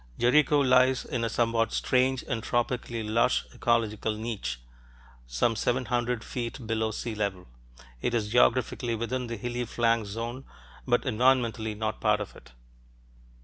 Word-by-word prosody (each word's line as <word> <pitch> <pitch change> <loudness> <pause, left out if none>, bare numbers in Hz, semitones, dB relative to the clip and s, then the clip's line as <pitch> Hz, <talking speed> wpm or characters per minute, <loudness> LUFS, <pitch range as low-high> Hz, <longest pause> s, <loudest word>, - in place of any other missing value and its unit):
Jericho 145 +4 +4
lies 130 -1 +4
in 120 -2 -3
a 115 - 0
somewhat 115 0 +1
strange 130 0 +1
and 115 -2 -2
tropically 120 -1 -1
lush 115 +4 +2
ecological 110 -2 0
niche, 105 - -4 0.7
some - - +1
seven 125 +3 0
hundred 120 -1 -1
feet 120 0 -5
below 110 0 0
sea 110 +1 -4
level; 100 -4 -3 0.6
it 120 - 0
is 105 -3 -1
geographically 120 0 +2
within 120 +3 -3
the 115 0 -4
hilly 120 +3 -3
flanks 115 -3 0
zone 115 +5 -5 0.4
but 120 -1 +2
environmentally 120 -3 +1
not 110 0 -3
part 105 -1 +3
of 105 - -6
it. 60 - -15
115 Hz, 145 wpm, -28 LUFS, 110-125 Hz, 0.7 s, Jericho